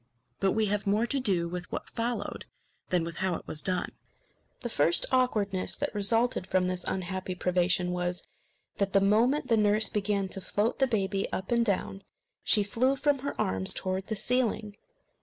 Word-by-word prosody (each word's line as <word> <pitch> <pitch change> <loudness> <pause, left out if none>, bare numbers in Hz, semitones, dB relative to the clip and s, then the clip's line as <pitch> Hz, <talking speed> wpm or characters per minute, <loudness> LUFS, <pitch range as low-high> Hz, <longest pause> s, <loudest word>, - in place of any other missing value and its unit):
But 195 - +2
we 220 -1 +2
have 205 0 -1
more 210 +4 +2
to 275 +3 +1
do 185 -8 +2
with 180 +1 -6
what - - -4
followed 230 -2 -3 0.4
than 180 -2 +2
with 170 0 -6
how 190 -1 0
it - - -8
was 155 - -2
done. 185 -1 +1 0.7
The 240 - -3
first 170 -4 +2
awkwardness 210 -7 +1
that 290 - -2
resulted 225 0 +1
from 185 -1 +2
this 180 -1 -3
unhappy 185 0 -3
privation 180 0 +1
was, 180 0 -2 0.5
that 200 -1 0
the 195 - +6
moment 225 +9 +2
the 230 - +4
nurse 210 0 +3
began 200 -1 0
to 195 - -5
float 210 +5 -1
the 270 - +4
baby 195 -4 -1
up 190 - -4
and 235 0 +3
down, 195 -2 -1 0.4
she 210 - +4
flew 250 +7 +1
from 280 0 +1
her 280 +2 -5
arms 95 0 +1
towards 185 0 -3
the 220 - -2
ceiling. 220 -2 0
200 Hz, 180 wpm, -29 LUFS, 185-230 Hz, 0.7 s, the